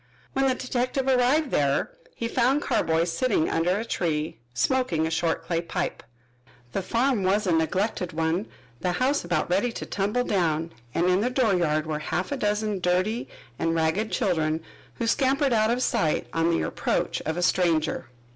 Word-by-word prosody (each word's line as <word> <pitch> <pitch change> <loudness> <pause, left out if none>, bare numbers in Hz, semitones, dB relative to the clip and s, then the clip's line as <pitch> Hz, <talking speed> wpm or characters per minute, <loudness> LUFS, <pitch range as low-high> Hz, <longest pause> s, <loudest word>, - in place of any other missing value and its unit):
When 270 0 +2
the 260 - +2
detective 255 +1 -1
arrived 265 +3 +3
there 140 -1 +1 0.2
he 230 - -2
found 255 +5 +2
Carboy 160 0 +1
sitting 170 0 +1
under 175 +4 +1
a 220 - -3
tree 155 - -2
smoking 170 - +1
a 160 - -2
short 165 0 0
clay 170 -1 0
pipe. 170 - -3 0.7
The 195 - -1
farm 235 +4 +1
was 195 +3 +2
a 180 - +1
neglected 180 +3 0
one, 165 +5 -1 0.3
the 180 - 0
house 265 +9 +1
about 175 -3 0
ready 200 +7 +1
to - - -5
tumble 205 +5 0
down, 165 -7 0 0.2
and 170 - +2
in 185 +2 +3
the 245 - +1
dooryard 180 - +1
were 155 -1 -2
half 175 - -2
a 280 - -1
dozen 210 -2 0
dirty 185 +6 0 0.3
and 165 0 +1
ragged 165 +7 0
children, 160 -3 0 0.3
who 235 - -2
scampered 270 +3 +2
out 215 -1 +3
of 245 +2 +1
sight 165 -11 +1
on 165 +1 +2
the 165 - +1
approach - - -1
of 160 +1 -1
a 175 - 0
stranger. 165 -6 +1
185 Hz, 175 wpm, -26 LUFS, 165-240 Hz, 0.7 s, arrived